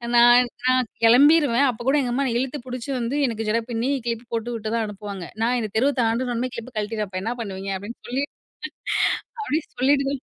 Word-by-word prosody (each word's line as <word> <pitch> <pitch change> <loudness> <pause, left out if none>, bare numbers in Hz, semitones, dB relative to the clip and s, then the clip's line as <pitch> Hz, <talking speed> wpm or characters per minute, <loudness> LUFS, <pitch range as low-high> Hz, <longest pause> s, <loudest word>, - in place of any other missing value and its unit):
நான், 240 +1 +7 0.2
நான் 255 -2 +3 0.2
கிளம்பிருவேன். 280 +2 +6
அப்பக் 240 +1 -5
கூட 295 - +4
எங்க 245 - -2
அம்மா 275 +3 +1
என்ன 235 - -1
இழுத்துப் 260 0 -4
புடிச்சி 250 +2 -5
வந்து, 240 +4 -2
எனக்கு 225 -2 -3
ஜட 230 +2 +2
பின்னி 235 +3 -1 0.2
க்ளிப் 230 0 -3
போட்டுவிட்டு 230 -1 -3
தான் 230 -1 0
அனுப்புவாங்க. 200 -3 -7 0.2
"நான் 245 +2 +2
இந்தத் 215 -2 -5
தெருவ 275 +5 +3
தாண்டுன 235 +2 0
உடனே 250 +2 -2
கிளிப்ப 235 +2 -8
கழட்டிவப்பேன்! 210 +1 -2
அப்ப 185 - -3
என்ன 235 +2 -1
பண்ணுவீங்க?" 195 -2 -5
அப்டின்னு 205 +5 -9
சொல்லி. 270 +3 0 1.2
அப்படி 320 -7 0 0.2
சொல்லிட்டு 275 +1 +3
தான் 275 -2 -5
235 Hz, 195 wpm, -23 LUFS, 225-255 Hz, 1.2 s, நான்